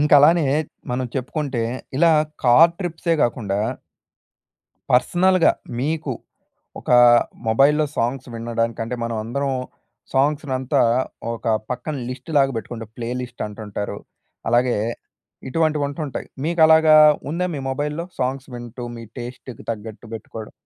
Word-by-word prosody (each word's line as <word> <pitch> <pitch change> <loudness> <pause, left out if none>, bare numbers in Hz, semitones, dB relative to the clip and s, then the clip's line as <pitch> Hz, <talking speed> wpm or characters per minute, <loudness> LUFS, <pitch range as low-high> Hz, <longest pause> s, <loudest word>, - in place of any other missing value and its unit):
ఇంక 150 0 +1
అలానే 155 +1 +5 0.4
మనం 125 +1 -1
చెప్పుకుంటే, 130 -1 -2 0.3
ఇలా 165 +2 +5 0.3
కార్ 155 +8 +7
ట్రిప్సే 170 -2 -1
గాకుండా... 105 -4 0 1.3
పర్సనల్‌గా 180 +7 +4 0.3
మీకు 150 +1 -1 0.7
ఒకా 125 - +4 0.5
మొబైల్‌లో 140 +7 +4
సాంగ్స్ 125 +2 -1
వినడంకంటే 115 0 -2
మనమందరం 115 +5 -2 0.6
సాంగ్స్‌నంతా 135 -1 +1 0.5
ఒక 115 -1 0 0.2
పక్కన 125 +5 -3
లిస్ట్‌లాగా 135 +2 0
పెట్టుకుంటాం. 115 0 -6
ప్లే 115 -1 -3
లిస్ట్ 125 -1 -7
అంటుంటారు. 105 -1 -5 0.5
అలాగే 120 +1 +3 0.7
ఇటువంటివి 155 0 +1
ఉంటుంటాయి. 145 -1 -5 0.2
మీకు 170 +1 0
అలాగా 160 -1 +6 0.3
ఉందా 180 +3 -1
మీ - - -4
మొబైల్‌లో? 150 +5 -3
సాంగ్స్ 130 +1 -2
వింటూ 120 0 -7
మీ 115 - -8
టేస్ట్‌‌‌కి 120 +1 -8
తగ్గట్టు 110 +1 -7
పెట్టుకోవడం. 110 0 -8
130 Hz, 105 wpm, -22 LUFS, 115-150 Hz, 1.3 s, కార్